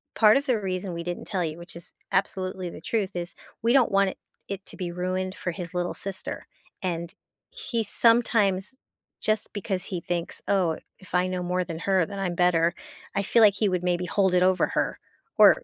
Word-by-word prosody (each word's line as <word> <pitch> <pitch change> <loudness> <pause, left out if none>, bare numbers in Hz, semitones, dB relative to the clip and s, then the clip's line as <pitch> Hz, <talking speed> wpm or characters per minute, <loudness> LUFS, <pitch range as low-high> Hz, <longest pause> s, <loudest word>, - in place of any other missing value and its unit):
"Part 215 0 +6
of 280 - -1
the 240 -4 +2
reason 185 -2 -3
we 170 0 -4
didn't 175 0 -4
tell 185 -4 0
you," 155 +1 -4
which 170 0 -9
is 170 - -9 0.2
absolutely 185 -1 -1
the - - -10
truth, 195 -2 -1
is, 175 0 -4 0.3
we 235 - +3
don't 260 -6 +5
want 195 0 +4
it - - -15 0.3
it 195 -1 -5
to - - -3
be 175 -3 -3
ruined 185 +1 -2
for 175 - -3
his 175 +1 -6
little 175 0 -1
sister, 195 -1 -3 0.3
and 170 -2 -3 0.4
he 355 - -2
sometimes 215 -2 +3 0.5
just 215 -1 +1
because 195 -2 -1
he 180 -3 -3
thinks, 170 0 -2
"Oh, 180 -5 +2 0.2
if 185 -2 -7
I 180 - +4
know 185 -1 -2
more 180 +1 0
than 165 -1 -5
her, 190 -2 +2
then 200 +2 -7
I'm 180 -3 -1
better," 170 -1 +3 0.4
I 200 - +1
feel 230 +3 +3
like 200 -2 +6
he 210 - +2
would 180 -1 -1
maybe 180 0 0
hold 190 0 +2
it 180 - +5
over 185 0 +3
her, - - -1 0.4
or, - - +7
185 Hz, 205 wpm, -26 LUFS, 175-200 Hz, 0.5 s, or